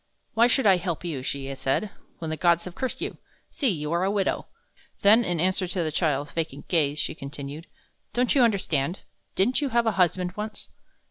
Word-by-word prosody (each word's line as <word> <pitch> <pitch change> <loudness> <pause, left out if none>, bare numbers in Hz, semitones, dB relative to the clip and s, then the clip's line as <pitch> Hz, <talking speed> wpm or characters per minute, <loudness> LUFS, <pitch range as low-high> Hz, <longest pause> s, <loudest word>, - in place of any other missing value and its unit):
"Why 230 +2 +5
should 260 +1 +2
I 195 -3 +6
help 175 -2 -3
you," 155 -6 -3
she 135 +1 -4
said, 135 +10 -1 0.3
"when 160 -2 -4
the - - -1
gods 170 +1 +3
have 180 - -7
cursed 260 +6 -3
you? - - -4 0.3
See, 280 - +1
you 150 -5 -2
are 170 +2 +1
a 190 - +2
widow!" 200 -1 0 0.6
Then, 215 +4 +7
in 175 -5 -1
answer 185 +2 +1
to 180 0 -1
the 155 - -2
child's 150 -3 0
vacant 160 -4 -4
gaze, 150 -4 +2
she 150 - -1
continued: 140 +2 -7 0.4
"Don't 245 +2 +2
you 275 - +4
understand? 185 - +1 0.3
Didn't 245 +10 +2
you 285 - 0
have 235 -1 +2
a 225 - +3
husband 180 0 +2
once?" 210 0 -6
175 Hz, 200 wpm, -26 LUFS, 150-210 Hz, 0.6 s, Then